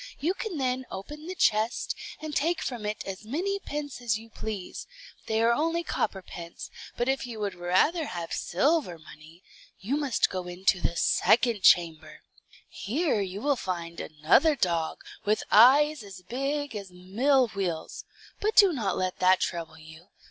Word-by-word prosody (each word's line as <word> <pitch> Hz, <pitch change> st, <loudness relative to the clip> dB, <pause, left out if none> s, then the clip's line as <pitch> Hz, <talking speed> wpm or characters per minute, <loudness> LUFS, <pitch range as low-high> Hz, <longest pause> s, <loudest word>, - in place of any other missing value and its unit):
You 335 Hz, +6 st, 0 dB
can 390 Hz, -4 st, -5 dB
then 260 Hz, -1 st, -1 dB
open 295 Hz, -, -8 dB
the 370 Hz, -, -5 dB
chest, 220 Hz, -7 st, +1 dB, 0.2 s
and 310 Hz, -1 st, -6 dB
take 330 Hz, +4 st, +1 dB
from 235 Hz, -5 st, -4 dB
it 210 Hz, -, -4 dB
as 195 Hz, +1 st, -6 dB
many 360 Hz, -, -2 dB
pence 290 Hz, -7 st, -6 dB
as 230 Hz, -3 st, 0 dB
you 225 Hz, +1 st, -14 dB
please, 210 Hz, -5 st, -6 dB, 0.4 s
they 220 Hz, +1 st, +1 dB
are 235 Hz, +1 st, +4 dB
only 330 Hz, +5 st, 0 dB
copper 195 Hz, -, -2 dB
pence; 170 Hz, -1 st, -9 dB, 0.3 s
but 240 Hz, -, 0 dB
if 265 Hz, -1 st, 0 dB
you 230 Hz, -3 st, -7 dB
would 205 Hz, -2 st, -2 dB
rather 185 Hz, -, +1 dB
have 170 Hz, -1 st, -5 dB
silver 270 Hz, -, 0 dB
money, 155 Hz, +2 st, -15 dB, 0.4 s
you 230 Hz, +9 st, -2 dB
must 285 Hz, -5 st, +1 dB
go 185 Hz, -1 st, -4 dB
into 180 Hz, +1 st, 0 dB
the 170 Hz, -, -1 dB
second 235 Hz, +3 st, +3 dB
chamber. 170 Hz, -4 st, +3 dB, 0.5 s
Here 265 Hz, -, -1 dB
you 195 Hz, +1 st, -5 dB
will 285 Hz, +1 st, +2 dB
find 170 Hz, -6 st, -5 dB
another 155 Hz, -, +3 dB
dog, 170 Hz, -, -1 dB, 0.2 s
with 210 Hz, +1 st, +1 dB
eyes 285 Hz, +6 st, +6 dB
as 195 Hz, -3 st, -11 dB
big 275 Hz, +5 st, -3 dB
as 200 Hz, -2 st, -6 dB
mill 235 Hz, +9 st, +1 dB
wheels; 185 Hz, -6 st, -4 dB, 0.4 s
but 425 Hz, +1 st, 0 dB
do 395 Hz, -4 st, +7 dB
not 215 Hz, -9 st, -1 dB
let 185 Hz, -1 st, -2 dB
that 185 Hz, 0 st, +5 dB
trouble 165 Hz, -2 st, -3 dB
you. 160 Hz, +2 st, -14 dB
215 Hz, 165 wpm, -27 LUFS, 180-285 Hz, 0.5 s, do